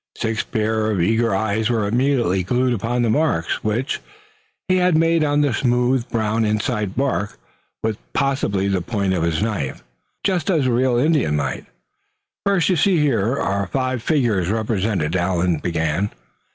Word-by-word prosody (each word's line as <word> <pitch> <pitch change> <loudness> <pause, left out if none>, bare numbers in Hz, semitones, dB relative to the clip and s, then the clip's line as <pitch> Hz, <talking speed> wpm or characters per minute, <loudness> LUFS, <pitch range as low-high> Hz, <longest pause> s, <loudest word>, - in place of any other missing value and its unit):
Six 115 0 -1
pair 110 0 -1
of 105 -4 0
eager 115 +6 +2
eyes 110 +1 0
were 110 -4 +1
immediately 120 -5 +1
glued 125 +7 +1
upon 120 +3 -1
the 115 - +1
marks 140 - 0
which 115 +5 -1 0.7
he 185 0 +3
had 180 -3 +3
made 165 0 +3
on 145 0 +2
the 145 -4 +1
smooth 125 +1 +1
brown 110 -1 0
inside 105 -1 -1
bark, 125 -6 -1 0.5
with 110 -1 -1
possibly 115 -8 0
the 95 -2 0
point 100 0 -1
of 90 - 0
his 85 +3 0
knife, 100 -12 -3 0.4
just 185 -5 0
as 160 -7 +2
the 130 - +2
real 125 0 +2
Indian 140 - +2
might. 70 -3 -3 0.8
"First, 195 -3 +2
you 180 - +2
see, 185 +3 +3
here 125 -4 +1
are 100 0 -1
five 130 +5 -1
figures 115 - +1
represented," 105 -6 -1
Allan 90 -1 +1
began. 85 +3 -1
110 Hz, 160 wpm, -21 LUFS, 100-130 Hz, 0.8 s, he